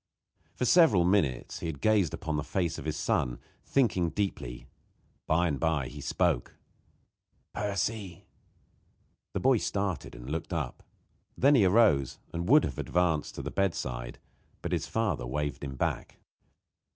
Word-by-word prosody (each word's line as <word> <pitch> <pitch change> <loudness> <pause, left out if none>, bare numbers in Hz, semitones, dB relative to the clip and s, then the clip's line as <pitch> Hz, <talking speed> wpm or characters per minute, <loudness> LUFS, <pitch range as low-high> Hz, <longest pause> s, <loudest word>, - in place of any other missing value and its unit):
For 125 - -1
several 125 - +6
minutes 80 -10 +1
he - - -4
had 75 -4 -5
gazed 105 -8 +3
upon 80 -1 -3
the 75 - -1
face 85 +1 -1
of - - -8
his 75 -1 -2
son, - - 0 0.3
thinking 100 -10 +2
deeply. 80 -9 -3 0.6
By 85 +3 +3
and 75 -4 -2
by 80 -5 0
he 75 0 -9
spoke: 80 -5 0 1.0
"Percy!" 100 -2 -3 1.1
The - - +1
boy 130 -1 +4
started 100 -3 -2
and - - -10
looked 80 +5 -4
up. 75 -7 -3 0.6
Then 140 +3 +5
he 120 -8 +5
arose 90 - +4 0.2
and 85 +3 -3
would 150 +3 +7
have 65 - -3
advanced 85 -4 0
to - - -5
the - - -4
bedside, 60 -11 -2 0.5
but - - -3
his - - -1
father 110 - -1
waved 75 +1 -3
him 70 -1 -5
back. - - -2
85 Hz, 150 wpm, -29 LUFS, 75-100 Hz, 1.1 s, would